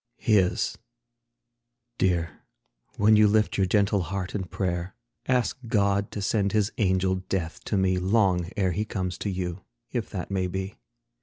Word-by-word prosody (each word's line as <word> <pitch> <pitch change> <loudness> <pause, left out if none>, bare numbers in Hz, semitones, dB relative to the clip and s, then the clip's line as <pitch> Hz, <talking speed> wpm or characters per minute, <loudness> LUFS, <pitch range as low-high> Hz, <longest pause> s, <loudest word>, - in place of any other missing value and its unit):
HIS. 100 -5 +1 1.2
Dear, 85 -3 0 0.6
when 110 +1 +5
you 105 0 +6
lift 105 +1 +2
your 95 -1 +2
gentle 100 +1 +2
heart 95 +1 -4
in 95 -3 -2
prayer, 90 -1 -3 0.3
Ask 125 0 +1
God 100 -3 +1
to 100 - -5
send 100 -1 +1
His 105 -1 +2
angel 95 -2 +2
Death 85 -4 -3
to 105 - 0
me 95 -1 +2
Long 95 -3 +2
ere 95 -3 +2
He 105 +5 -1
comes 95 -4 -4
to 105 - -2
you, 90 -1 -4 0.3
if - - -2
that - - -5
may 95 -1 0
be. 95 +2 -4
95 Hz, 155 wpm, -26 LUFS, 90-105 Hz, 1.2 s, you